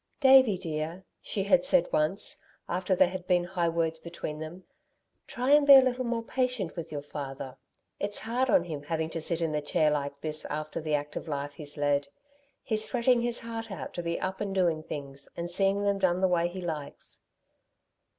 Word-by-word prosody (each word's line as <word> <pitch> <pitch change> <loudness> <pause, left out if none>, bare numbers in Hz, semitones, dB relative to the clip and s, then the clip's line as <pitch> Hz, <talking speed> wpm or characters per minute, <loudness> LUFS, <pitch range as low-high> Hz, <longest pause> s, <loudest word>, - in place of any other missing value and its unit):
"Davey, 265 -7 +7
dear," 165 +1 -4 0.2
she 195 - -1
had 265 +7 +4
said 275 -1 +3
once, 155 +6 -1 0.3
after 185 +2 0
there 175 - +5
had 185 -1 -7
been 180 -1 +3
high 175 -1 0
words 165 -1 -1
between 160 -2 -6
them, 160 +4 -8 0.6
"try 250 +3 -1
and 295 0 +6
be 280 - +11
a 265 - +10
little 255 0 0
more 235 -1 -2
patient 250 -7 -1
with 170 -3 -6
your 145 -2 -4
father. 135 -3 -6 0.4
It's 205 0 -2
hard 245 +4 -1
on 185 - +5
him 155 -5 -5
having 160 +1 -2
to 165 - -3
sit 170 +1 -1
in 160 -2 0
a 150 - 0
chair 155 0 +2
like 140 -1 -2
this 155 -1 -4
after 155 +2 -4
the 155 -1 0
active 145 +3 -4
life 145 -1 -3
he's 145 0 -8
led. 145 -1 +1 0.6
He's 220 -2 0
fretting 245 0 +2
his 240 0 -1
heart 230 -1 -6
out 175 -10 -6
to 175 - -3
be 170 0 -2
up 190 0 -3
and 200 -2 -2
doing 170 -4 +2
things, 140 -2 -8
and 170 +1 -3
seeing 195 +2 +2
them 200 -1 +1
done 185 -2 +2
the 190 - +3
way 175 -1 +2
he 185 +2 -7
likes." 155 -5 -6
175 Hz, 200 wpm, -29 LUFS, 155-205 Hz, 0.6 s, be